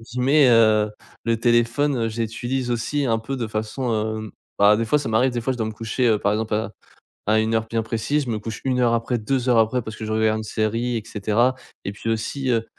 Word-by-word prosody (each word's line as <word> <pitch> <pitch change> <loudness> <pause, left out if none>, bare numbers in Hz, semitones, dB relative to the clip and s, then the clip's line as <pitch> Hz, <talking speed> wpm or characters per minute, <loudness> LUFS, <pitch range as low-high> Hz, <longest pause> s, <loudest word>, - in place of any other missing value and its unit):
guillemets, 125 +5 +3
heu, 110 -2 +4 0.3
le 115 0 +1
téléphone, 120 +1 +2
je 115 +1 -5
l'utilise 120 +3 -3
aussi 135 +5 -1
un 115 -3 +1
peu 135 +5 -5
de 120 -3 -2
façon, 110 +3 -3 0.2
hem 110 -1 -6 0.3
bah 105 +1 +6
des 115 - 0
fois 150 - +3
ça 140 - -4
m'arrive 125 +4 +3
des 120 -1 -3
fois, 130 - 0
je 125 - -7
dois 110 - -1
me 110 - -4
coucher, 115 +3 -1
heu, 110 -2 +3
par 100 - +1
exemple 110 0 -1
à 110 0 -2 0.5
à 110 +1 +3
une 110 +1 0
heure 110 0 +1
bien 115 0 -1
précise 115 +7 -1
je 120 - -4
me 110 - -1
couche 110 +1 -6
1 130 -1 0
heure 120 -1 +3
après, 115 +1 -1
2 125 +3 -1
heures 120 -2 +4
après, 115 +3 +2
parce 110 0 -8
que 110 - -6
je 110 - -3
regarde 110 0 +2
une 110 - -5
série 115 +3 -1
et 110 - -3
cetera 110 +5 +1 0.3
et 100 - -2
puis 110 +3 -6
aussi, 130 +4 -2
heu, 115 -2 +1
115 Hz, 250 wpm, -22 LUFS, 110-125 Hz, 0.5 s, bah